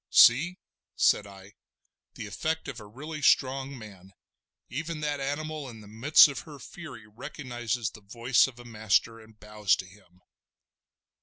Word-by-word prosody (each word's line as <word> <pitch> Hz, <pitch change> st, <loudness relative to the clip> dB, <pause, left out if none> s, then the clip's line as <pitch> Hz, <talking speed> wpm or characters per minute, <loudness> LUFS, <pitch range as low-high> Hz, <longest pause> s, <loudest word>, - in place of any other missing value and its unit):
"See!" 160 Hz, +10 st, +6 dB, 0.4 s
said 105 Hz, -, +3 dB
I, 100 Hz, +1 st, -14 dB, 0.6 s
"the -, -, -6 dB
effect 160 Hz, 0 st, -3 dB
of 130 Hz, -4 st, -6 dB
a 105 Hz, -, -11 dB
really 150 Hz, +8 st, -8 dB
strong 135 Hz, 0 st, +2 dB
man. 95 Hz, -4 st, -13 dB, 0.5 s
Even 160 Hz, +2 st, -4 dB
that 145 Hz, -1 st, -1 dB
animal 145 Hz, +1 st, -4 dB
in 110 Hz, -2 st, -11 dB
the 105 Hz, -, -13 dB
midst 115 Hz, +11 st, +6 dB
of 140 Hz, -, -5 dB
her 150 Hz, -3 st, -11 dB
fury 150 Hz, -5 st, -10 dB
recognises 120 Hz, -1 st, -4 dB
the 105 Hz, -, -14 dB
voice 115 Hz, +6 st, +2 dB
of 130 Hz, -2 st, -11 dB
a 120 Hz, -, -12 dB
master, 115 Hz, 0 st, 0 dB
and 110 Hz, -1 st, -18 dB
bows 105 Hz, -2 st, +1 dB
to -, -, -7 dB
him!" 90 Hz, -1 st, -20 dB
120 Hz, 155 wpm, -28 LUFS, 105-145 Hz, 0.6 s, See